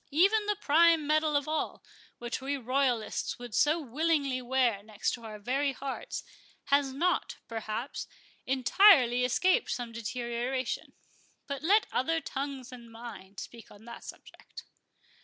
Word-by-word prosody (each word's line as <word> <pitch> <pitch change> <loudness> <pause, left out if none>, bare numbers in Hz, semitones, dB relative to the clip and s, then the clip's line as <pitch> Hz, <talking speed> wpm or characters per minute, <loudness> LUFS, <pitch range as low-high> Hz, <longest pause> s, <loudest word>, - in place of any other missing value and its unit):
Even 400 +8 +3
the 420 - +1
prime 330 -3 +4
medal 305 0 +2
of 285 0 +1
all, 310 0 -2 0.3
which 240 +1 -4
we 280 +2 -2
royalists 255 -2 0
would 245 -2 -9
so 305 +8 +3
willingly 285 -1 0
wear 245 -4 +1
next 210 0 -2
our 225 -3 -9
very 270 +6 0
hearts, 275 - -5 0.5
has 280 -1 +4
not, 340 +7 0
perhaps, 225 +3 -4 0.4
entirely 260 - +5
escaped 370 - +2
some 240 -2 -3
deterioration—But 245 +4 -5
let 405 +7 +4
other 325 +6 +1
tongues 275 -4 -5
than 240 -3 -11
mine 225 -4 -10
speak 230 +2 -9
on 205 +2 -16
that 235 0 -10
subject." - - -12
265 Hz, 130 wpm, -30 LUFS, 235-305 Hz, 0.5 s, entirely